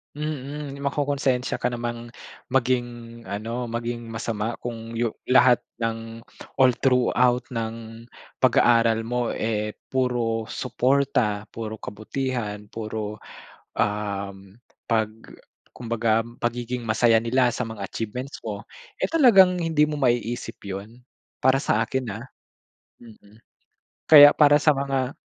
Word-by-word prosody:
Mm, 145 Hz, -1 st, -5 dB
makokonsensya 140 Hz, -2 st, -1 dB
ka 125 Hz, -, 0 dB
namang 120 Hz, -1 st, -4 dB, 0.4 s
maging 125 Hz, -1 st, +1 dB, 0.4 s
ano, 115 Hz, +5 st, -4 dB
maging 115 Hz, 0 st, -4 dB
masama 110 Hz, 0 st, -3 dB
kung 115 Hz, -1 st, -6 dB
yu 115 Hz, -1 st, 0 dB, 0.2 s
lahat 130 Hz, -1 st, +5 dB, 0.2 s
ng 115 Hz, 0 st, -4 dB, 0.3 s
all 130 Hz, -2 st, +5 dB
throughout 125 Hz, -1 st, +3 dB
ng 115 Hz, 0 st, -6 dB, 0.3 s
pag-aaral 115 Hz, -1 st, +4 dB
mo, 120 Hz, +1 st, -1 dB
eh, 105 Hz, -1 st, -2 dB, 0.2 s
puro 120 Hz, -4 st, 0 dB
suporta, 125 Hz, -4 st, 0 dB
puro 110 Hz, -1 st, -5 dB
kabutihan, 110 Hz, 0 st, -4 dB
puro, 110 Hz, -1 st, -5 dB, 0.6 s
um 100 Hz, -1 st, -3 dB, 0.3 s
'pag 110 Hz, -2 st, +1 dB, 0.6 s
kumbaga 115 Hz, -2 st, 0 dB, 0.2 s
pagiging 120 Hz, +1 st, -3 dB
masaya 115 Hz, +1 st, +4 dB
nila 120 Hz, +2 st, +2 dB
sa 125 Hz, -, -3 dB
mga 110 Hz, -3 st, -7 dB
achievements 125 Hz, -, -5 dB
mo, -, -, -5 dB, 0.4 s
eh -, -, +1 dB
talagang 195 Hz, -, +6 dB
hindi 160 Hz, -3 st, +2 dB
mo 150 Hz, -1 st, -3 dB
maiisip 120 Hz, -2 st, -1 dB
‘yon, 100 Hz, +5 st, -8 dB, 0.4 s
para 130 Hz, +1 st, +4 dB
sa 115 Hz, -5 st, +1 dB
akin 130 Hz, +2 st, -3 dB
ah. 115 Hz, +4 st, -8 dB, 0.8 s
Mm. 110 Hz, -1 st, -17 dB, 0.7 s
Kaya 145 Hz, -2 st, +10 dB
para 145 Hz, -1 st, +6 dB
sa 150 Hz, +1 st, +4 dB
mga 135 Hz, -1 st, -2 dB
120 Hz, 115 wpm, -24 LUFS, 110-130 Hz, 0.8 s, Kaya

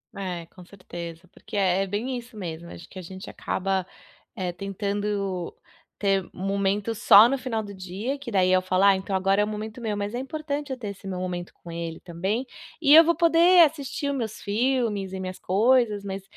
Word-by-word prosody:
É, 180 Hz, -4 st, -4 dB
com 180 Hz, -, -15 dB
certeza, 175 Hz, -2 st, -9 dB
porque -, -, -8 dB
é 190 Hz, -1 st, +2 dB
é -, -, -4 dB
bem 235 Hz, +6 st, -2 dB
isso 235 Hz, -2 st, -10 dB
mesmo. 170 Hz, -2 st, -6 dB
Acho 170 Hz, -, -11 dB
que 190 Hz, -, -13 dB
a -, -, -5 dB
gente 185 Hz, +2 st, -9 dB
acaba, 190 Hz, -1 st, -2 dB, 0.5 s
eh, 180 Hz, -2 st, -2 dB
tentando 200 Hz, -1 st, -3 dB, 0.5 s
ter 195 Hz, -2 st, +2 dB
um 185 Hz, -, -6 dB
momento 200 Hz, +2 st, 0 dB
só 205 Hz, +2 st, +8 dB
no 275 Hz, +2 st, 0 dB
final 245 Hz, -4 st, -2 dB
do 205 Hz, -1 st, -8 dB
dia, 190 Hz, +9 st, -4 dB
que 275 Hz, -4 st, -8 dB
daí 185 Hz, -3 st, +3 dB
eu 185 Hz, 0 st, +4 dB
falo: 185 Hz, +1 st, +1 dB
"Ah, 200 Hz, -1 st, +7 dB
então 190 Hz, +1 st, -3 dB
agora 195 Hz, +2 st, +2 dB
é -, -, +4 dB
o -, -, -6 dB
momento 215 Hz, +2 st, -6 dB
meu", 215 Hz, -3 st, -2 dB
mas 205 Hz, +1 st, -3 dB
é -, -, -2 dB
importante 290 Hz, 0 st, -4 dB
eu 260 Hz, -, -3 dB
ter 220 Hz, -5 st, -5 dB
esse 200 Hz, 0 st, -9 dB
meu 185 Hz, -1 st, -3 dB
momento 175 Hz, -1 st, -4 dB
com 170 Hz, -, -12 dB
ele 165 Hz, -1 st, -5 dB
também. 190 Hz, +9 st, -2 dB, 0.4 s
E 290 Hz, -2 st, +6 dB
eu 325 Hz, -, +11 dB
vou 340 Hz, +1 st, +2 dB
poder 340 Hz, +1 st, +6 dB
assistir 285 Hz, -1 st, -3 dB
o -, -, 0 dB
meus 230 Hz, -5 st, -4 dB
filmes 215 Hz, -3 st, 0 dB
e 190 Hz, -, -4 dB
minhas 185 Hz, 0 st, -5 dB
coisas, 215 Hz, +1 st, +2 dB
mas 195 Hz, 0 st, -5 dB
200 Hz, 215 wpm, -25 LUFS, 185-240 Hz, 0.5 s, eu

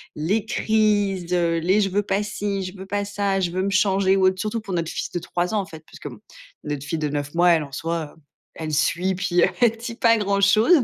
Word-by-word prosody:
les 195 Hz, +8 st, -1 dB
crises, 205 Hz, -5 st, +1 dB
heu, 170 Hz, -1 st, +1 dB
les: 185 Hz, +6 st, +2 dB
«Je 195 Hz, -, +1 dB
veux 205 Hz, +2 st, 0 dB
pas 195 Hz, 0 st, 0 dB
ci, 205 Hz, -1 st, -3 dB
je 185 Hz, +1 st, -7 dB
veux 190 Hz, -, -8 dB
pas 205 Hz, +1 st, -2 dB
ça, 200 Hz, -1 st, -1 dB
je 180 Hz, -2 st, 0 dB
veux 185 Hz, +2 st, -1 dB
me 200 Hz, -, 0 dB
changer», 195 Hz, -1 st, +3 dB
ou 190 Hz, -1 st, +4 dB
autre, 185 Hz, 0 st, 0 dB
surtout 215 Hz, +3 st, -2 dB
pour 200 Hz, -3 st, -6 dB
notre 165 Hz, -2 st, -2 dB
fils -, -, -4 dB
de 175 Hz, -, -2 dB
3 175 Hz, +3 st, -2 dB
ans, -, -, +2 dB
en -, -, -7 dB
fait, 160 Hz, -4 st, -12 dB
puisque -, -, -9 dB
bon, -, -, -12 dB, 0.4 s
notre 145 Hz, -2 st, -4 dB
fille 155 Hz, +2 st, -3 dB
de 150 Hz, -1 st, -1 dB
9 145 Hz, 0 st, -4 dB
mois, 175 Hz, +1 st, +4 dB
elle 165 Hz, -2 st, +3 dB
en 140 Hz, -, -11 dB
soi, 165 Hz, +1 st, -4 dB
heu, 160 Hz, -, -24 dB, 0.3 s
elle 155 Hz, -1 st, -5 dB
suit, 175 Hz, +5 st, +1 dB
puis 180 Hz, -2 st, +1 dB, 0.2 s
elle 230 Hz, -2 st, +4 dB
dit 230 Hz, +1 st, -6 dB
pas 230 Hz, 0 st, +4 dB
grand 200 Hz, -1 st, 0 dB
chose. 220 Hz, -, +5 dB
190 Hz, 255 wpm, -23 LUFS, 170-205 Hz, 0.4 s, chose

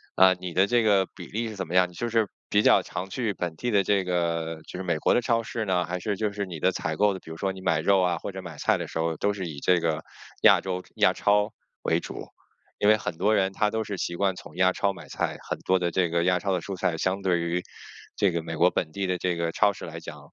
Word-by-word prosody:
呃， 95 Hz, 0 st, +7 dB
你 90 Hz, -1 st, -7 dB
的 95 Hz, +3 st, +4 dB
这 120 Hz, +1 st, +3 dB
个 100 Hz, -3 st, +4 dB
比 90 Hz, -5 st, -9 dB
例 115 Hz, +3 st, -3 dB
是 110 Hz, -, -7 dB
怎 95 Hz, -1 st, -4 dB
么 85 Hz, -, -7 dB
样？ 90 Hz, -1 st, +4 dB
就 120 Hz, +6 st, -3 dB
是 115 Hz, -2 st, +2 dB, 0.2 s
比 105 Hz, -, +4 dB
较 -, -, +5 dB
常 95 Hz, -, -6 dB
去 115 Hz, 0 st, -2 dB
本 85 Hz, -3 st, -4 dB
地 120 Hz, +8 st, -2 dB
的 100 Hz, -2 st, +4 dB
这 100 Hz, 0 st, +2 dB
个， 85 Hz, -2 st, -1 dB
呃， -, -, -15 dB
就 -, -, -9 dB
是 95 Hz, -, -4 dB
美 85 Hz, -3 st, 0 dB
国 -, -, +3 dB
的 -, -, +3 dB
超 115 Hz, -1 st, +1 dB
市 110 Hz, 0 st, -3 dB
呢？ 90 Hz, -3 st, +1 dB
还 90 Hz, +1 st, -3 dB
是 100 Hz, +2 st, -2 dB
就 105 Hz, 0 st, -1 dB
是 100 Hz, 0 st, -3 dB
你 85 Hz, -4 st, -7 dB
的 95 Hz, -, +3 dB
采 80 Hz, -2 st, -2 dB
购 105 Hz, -1 st, +3 dB
的， 95 Hz, -, -6 dB
比 80 Hz, -, -11 dB
如 80 Hz, -, -7 dB
说 95 Hz, +2 st, -1 dB
你 95 Hz, -, -10 dB
买 80 Hz, -4 st, +1 dB
肉 95 Hz, +4 st, +3 dB
啊， 90 Hz, -2 st, +1 dB
或 100 Hz, -, -6 dB
者 95 Hz, -, -6 dB
买 85 Hz, -5 st, -9 dB
菜 -, -, +2 dB
的 -, -, -5 dB
时 -, -, -5 dB
候 80 Hz, 0 st, 0 dB
都 100 Hz, +6 st, 0 dB
是 95 Hz, -3 st, -4 dB
以 75 Hz, -3 st, -7 dB
这 90 Hz, +3 st, +3 dB
个 80 Hz, -1 st, -1 dB, 0.4 s
亚 -, -, +7 dB
洲 90 Hz, -1 st, -4 dB
亚 -, -, +4 dB
超 105 Hz, +1 st, +2 dB, 0.3 s
为 -, -, +2 dB
主？ -, -, -7 dB, 0.5 s
因 105 Hz, -, +4 dB
为 110 Hz, -, +6 dB
很 110 Hz, -, -4 dB
多 105 Hz, +5 st, +2 dB
人 95 Hz, -1 st, +1 dB
他 105 Hz, +2 st, +1 dB
都 110 Hz, +1 st, -1 dB
是 105 Hz, -1 st, -5 dB
习 85 Hz, -, -3 dB
惯 95 Hz, +1 st, +1 dB
从 -, -, -12 dB
亚 95 Hz, 0 st, +4 dB
超 100 Hz, -, +1 dB
买 95 Hz, -, -11 dB
菜， -, -, -2 dB
很 -, -, -2 dB
多 95 Hz, 0 st, +1 dB
的 90 Hz, -1 st, 0 dB
这 90 Hz, 0 st, +1 dB
个 85 Hz, 0 st, +1 dB
亚 90 Hz, 0 st, +3 dB
超 100 Hz, -, -2 dB
的 90 Hz, -, +1 dB
蔬 100 Hz, -, -6 dB
菜 90 Hz, -2 st, -1 dB
相 95 Hz, +4 st, -1 dB
对 90 Hz, -3 st, +1 dB
于 85 Hz, +1 st, -1 dB, 0.6 s
这 100 Hz, -3 st, +3 dB
个 85 Hz, -1 st, -1 dB
美 80 Hz, -1 st, -5 dB
国 90 Hz, +3 st, +5 dB
本 80 Hz, -3 st, -2 dB
地 100 Hz, +3 st, -3 dB
的 90 Hz, 0 st, 0 dB
这 90 Hz, -1 st, 0 dB
个 85 Hz, -1 st, -1 dB
超 100 Hz, -, +4 dB
市 -, -, -9 dB
来 -, -, -7 dB
讲， -, -, -9 dB
95 Hz, 315 characters per minute, -26 LUFS, 85-100 Hz, 0.6 s, 呃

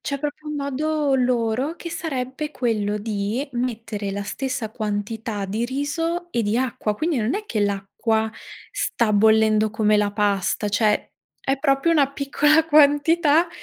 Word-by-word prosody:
C'è 280 Hz, -, -3 dB
proprio 300 Hz, +1 st, -5 dB
un 300 Hz, -, -3 dB
modo 290 Hz, +1 st, 0 dB
loro 250 Hz, +3 st, 0 dB
che 340 Hz, -1 st, -8 dB
sarebbe 300 Hz, -4 st, -4 dB
quello 210 Hz, -4 st, -1 dB
di 210 Hz, +4 st, -2 dB
mettere 230 Hz, -5 st, -3 dB
la 200 Hz, 0 st, -3 dB
stessa 255 Hz, 0 st, -3 dB
quantità 215 Hz, -1 st, -3 dB
di 220 Hz, +5 st, -2 dB
riso 330 Hz, +7 st, -2 dB
e 235 Hz, -, 0 dB
di 210 Hz, +1 st, 0 dB
acqua, 235 Hz, -4 st, -1 dB
quindi 315 Hz, +6 st, -1 dB
non 225 Hz, +5 st, 0 dB
è 425 Hz, +1 st, -3 dB
che 230 Hz, -, -3 dB
l'acqua 205 Hz, +2 st, 0 dB, 0.4 s
sta 230 Hz, -3 st, 0 dB
bollendo 220 Hz, +1 st, +4 dB
come 215 Hz, 0 st, +2 dB
la 205 Hz, -1 st, +1 dB
pasta, 205 Hz, 0 st, 0 dB
cioè 210 Hz, +1 st, +1 dB, 0.3 s
è 270 Hz, 0 st, -1 dB
proprio 275 Hz, +3 st, +2 dB
una 280 Hz, -4 st, +3 dB
piccola 295 Hz, +3 st, +3 dB
quantità. 305 Hz, +2 st, +4 dB
245 Hz, 150 wpm, -23 LUFS, 215-290 Hz, 0.4 s, bollendo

